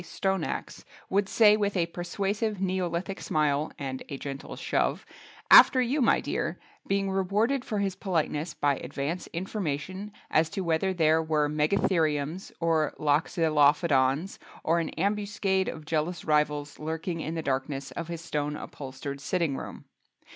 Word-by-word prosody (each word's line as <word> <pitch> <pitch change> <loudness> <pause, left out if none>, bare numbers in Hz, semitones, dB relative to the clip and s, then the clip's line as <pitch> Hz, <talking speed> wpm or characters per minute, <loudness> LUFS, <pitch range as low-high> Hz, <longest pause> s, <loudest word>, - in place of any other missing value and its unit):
Stoneaxe 190 -2 -3 0.3
would 200 0 +2
say 210 -2 +6
with 205 -2 0
a 170 - +2
persuasive 195 +5 -2
Neolithic 185 0 -2
smile 150 -1 0
(and 135 -2 -4
gentle 140 0 -6
shove) - - -1 0.5
"After 260 - +9
you 255 +4 +1
my 235 - +4
dear," - - -2 0.3
being 195 0 0
rewarded 210 +8 +1
for 220 -4 -3
his 195 -2 -1
politeness 165 -4 -2
by 145 -2 +1
advance 140 +7 -4
information 185 +1 -4 0.2
as 160 0 +3
to 195 - -3
whether 170 +2 +1
there 160 -3 +3
were 155 -2 +1
Megatheriums 155 +1 0
or 165 -2 +1
Loxolophodons 150 0 +2 0.2
or 165 +2 +2
an 165 - -2
ambuscade 200 0 0
of 155 -1 -6
jealous 160 +3 -2
rivals 150 -1 0
lurking 160 +2 -3
in 160 +2 -4
the 160 - -3
darkness 135 0 -2
of 165 +5 -5
his 170 -1 -5
stone 150 -3 -2
upholstered 140 0 -7
sitting 170 -4 0
room. - - -8
165 Hz, 140 wpm, -28 LUFS, 150-190 Hz, 0.5 s, After